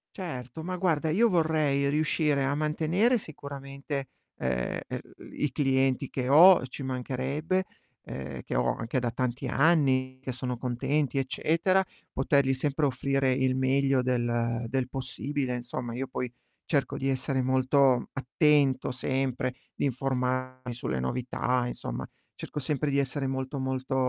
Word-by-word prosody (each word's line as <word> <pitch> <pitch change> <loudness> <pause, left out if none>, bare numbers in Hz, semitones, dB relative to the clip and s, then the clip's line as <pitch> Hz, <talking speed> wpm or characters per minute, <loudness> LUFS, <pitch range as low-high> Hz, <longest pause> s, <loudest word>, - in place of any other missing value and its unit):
Certo, 155 - -6
ma 185 +2 -3
guarda, 165 -4 +1
io 225 +8 +4
vorrei 155 -5 +2
riuscire 150 -1 +1
a 135 +1 +1
mantenere 165 - +2
sicuramente, 140 -3 -6 0.3
ehm, 65 -1 -1
er - - -4 0.3
i 150 - 0
clienti 135 -1 +1
che 125 -2 -2
ho, 165 0 +8
ci 130 +2 -8
mancherebbe, 135 +7 -1 0.4
ehm, - - -6
che - - -5
ho 60 0 +2
anche 115 +3 -2
da 120 -1 -1
tanti 125 +2 -2
anni, 130 -3 +3
che 130 0 -5
sono 125 0 -3
contenti, 130 +3 0
eccetera; 170 +8 +1 0.3
potergli 135 0 +2
sempre 145 +2 +1
offrire 135 0 +1
il 130 0 +2
meglio 135 0 +2
del 120 -1 0
del 130 +1 -1
possibile 135 0 -3
insomma, 120 0 -5
io 130 +3 -3
poi, 125 -1 -4 0.3
cerco 140 -4 0
di 135 - -2
essere 130 0 0
molto 130 0 +3
attento 135 0 +2
sempre, 130 0 -1 0.2
di - - -1
informarmi 130 -1 -1
sulle 65 - -3
novità, 125 - -1
insomma, - - -5 0.3
cerco 150 - -6
sempre 145 +1 -1
di 140 - +1
essere 140 0 -1
molto, 130 +1 -3
molto 130 0 -2
135 Hz, 140 wpm, -28 LUFS, 125-145 Hz, 0.4 s, ho